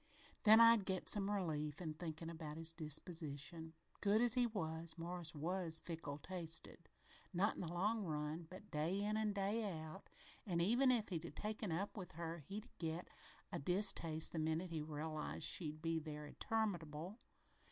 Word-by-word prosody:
"Then 220 +1 +10
I'd 230 -3 +8
get 190 -1 -1
some 200 -1 +7
relief 155 -7 -1
in 160 -4 -3
thinkin' 160 0 -5
about 160 -2 -6
his 165 0 -3
disposition. 160 0 -4 0.3
Good 205 +1 +4
as 240 -1 +6
he 250 -1 +4
was, 165 -6 -2
Morris 170 -1 -2
was 165 +1 +1
fickle 160 -4 -5
tasted, 165 0 -4 0.5
not 200 +5 +3
in - - -6
the 170 -2 -3
long 210 +5 +1
run, 155 0 -3
but 190 +3 -11
day 160 +6 0
in 210 +1 0
an' 215 -1 +1
day 205 +1 0
out, 160 +5 -9 0.3
an' 175 -5 -1
even 240 +9 +4
if 235 -4 +2
he'd 170 -4 -1
be 170 - -6
taken 215 -2 -3
up 190 +5 -2
with 185 -4 -6
her 165 +1 -4
he'd 200 - -7
get 165 +1 -3 0.4
a - - -2
distaste 170 -2 +2
the 165 - -2
minute 160 +3 0
he 160 -2 -2
reelized 155 +1 -4
she'd 155 -1 +1
be 165 0 +1
there 150 -1 -6
interminable. 175 0 -2
170 Hz, 170 wpm, -40 LUFS, 160-200 Hz, 0.5 s, Then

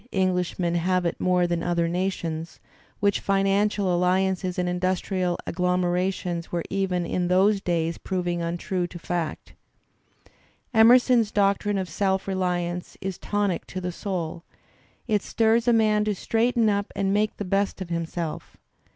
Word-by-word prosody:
Englishmen 180 -2 0
have 180 +1 +1
it 170 - -2
more 180 -1 +3
than 170 -1 -1
other 170 -1 0
nations, 170 -2 -3 0.4
which 200 -1 +2
financial 195 -1 +1
alliances 185 +1 +1
and 180 0 0
industrial 180 0 -1
agglomerations 180 -1 -1
were 170 -1 -1
even 185 -3 0
in 175 +1 -1
those 195 +3 +3
days 165 -2 -1
proving 175 -2 -2
untrue 175 +2 -2
to 175 - -9
fact. 170 -2 -4 1.2
Emerson's 235 0 +6
doctrine 200 0 +1
of 190 -1 -2
self 190 +3 -1
reliance 180 -2 -2
is 190 -2 -5
tonic 205 -3 -1
to 185 - -5
the 180 0 -3
soul, 175 -3 -4 0.7
it 210 -3 +2
I - - -15
stirs 230 +1 +2
a - - +6
man 215 -2 +3
to 210 -1 0
straighten 230 +3 +1
up 205 -1 0
and 195 0 0
make 210 +1 +1
the 205 - -4
best 195 +2 0
of 185 -3 -6
himself. 170 -1 -4
185 Hz, 145 wpm, -25 LUFS, 175-200 Hz, 1.2 s, Emerson's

